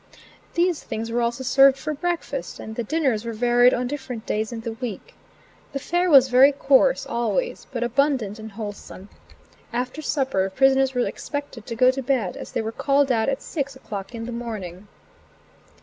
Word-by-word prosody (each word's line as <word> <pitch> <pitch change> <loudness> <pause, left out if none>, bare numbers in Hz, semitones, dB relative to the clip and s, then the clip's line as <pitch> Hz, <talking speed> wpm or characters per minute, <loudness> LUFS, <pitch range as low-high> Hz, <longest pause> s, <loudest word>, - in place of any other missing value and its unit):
These 345 -1 +1
things 225 +1 -5
were 240 +1 0
also 235 +2 -1
served 270 +1 +5
for 305 +2 -3
breakfast, 350 - -3
and 220 - -7
the 235 - -2
dinners 265 -5 0
were 230 -1 -4
varied 245 +2 +4
on 250 0 -1
different 255 -4 -5
days 215 +1 -2
in 230 -1 -5
the 230 0 -4
week. 225 -3 -7 0.6
The - - -1
fare 350 +6 0
was 270 -4 +7
very 260 +3 +6
coarse, 280 - +3
always, 240 - -2
but 240 -3 -2
abundant 240 -4 0
and 220 -1 -9
wholesome. 205 -2 -8 0.6
After 250 +5 -3
supper 265 -11 0
prisoners 270 +4 +3
were 245 - +2
expected 285 -6 -6
to 230 - -4
go 255 +2 +5
to 270 +1 -4
bed, 245 -9 0
as - - -9
they - - -1
were 220 - -3
called 275 +2 +2
out 225 +1 +2
at 275 0 -2
six 280 -4 -4
o'clock 205 -4 -7
in 230 0 -5
the 240 - -5
morning. 210 -6 -6
250 Hz, 180 wpm, -23 LUFS, 225-275 Hz, 0.6 s, was